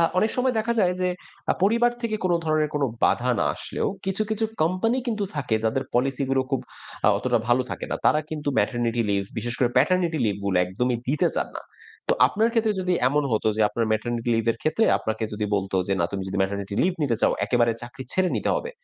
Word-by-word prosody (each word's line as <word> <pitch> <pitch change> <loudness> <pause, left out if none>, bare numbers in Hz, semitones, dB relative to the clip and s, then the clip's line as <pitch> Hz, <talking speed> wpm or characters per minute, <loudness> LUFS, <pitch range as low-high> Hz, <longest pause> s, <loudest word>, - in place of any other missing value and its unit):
আ - - +5 0.2
অনেক 215 +4 +2
সময় 250 -1 +1
দেখা 225 +2 0
যায় 180 -2 +3
যে 180 - +2 0.4
আ - - +6
পরিবার 235 +4 +4
থেকে 225 -2 -1
কোনো 175 -2 +3
ধরনের 155 -1 +1
কোনো 145 -2 +1 0.2
বাধা 125 0 +2
না - - +2
আসলেও - - -3 0.2
কিছু, 195 +2 0
কিছু 220 +1 0 0.2
কোম্পানি 185 +9 +1
কিন্তু 215 -3 -1
থাকে 130 -6 -1
যাদের 115 +4 +1
পলিসিগুলো 135 +1 +1
খুব 135 - +1 0.5
আ - - +8
অতটা - - +1
ভালো 125 +1 +4
থাকে - - -4
না। - - 0
তারা 155 - +4
কিন্তু 150 -2 -3
ম্যাটারনিটি 120 +2 0
লিভ, 100 -1 +1 0.2
বিশেষ 120 0 -3
করে 125 - +3
প্যাটারনিটি 175 -3 +3
লিভগুলো 100 -2 -1
একদমই 120 +7 -1
দিতে 155 +5 +2
চান - - 0
না। - - -7 0.5
তো - - +4
আপনার 220 +2 +1
ক্ষেত্রে 225 -2 +2
যদি 180 0 0 0.2
এমন 145 +2 +1
হতো 110 0 +1
যে - - -1
আপনার 115 +1 -1
ম্যাটারনিটি 115 +2 -1
লিভের 115 0 0
ক্ষেত্রে 155 +9 +2
আপনাকে 110 0 -2
যদি 105 0 -2
বলত 95 -1 -2 0.2
যে 100 - +2
"না, 85 - +3
তুমি 95 - -2
যদি 95 - -4
ম্যাটারনিটি 100 +1 -2
লিভ 185 - +2
নিতে 125 -6 +1
চাও, - - +4
একেবারে 120 -2 +2
চাকরি 120 +2 -8
ছেড়ে 185 -1 +2
নিতে - - 0
হবে।" 475 - -4
135 Hz, 215 wpm, -24 LUFS, 115-185 Hz, 0.5 s, আ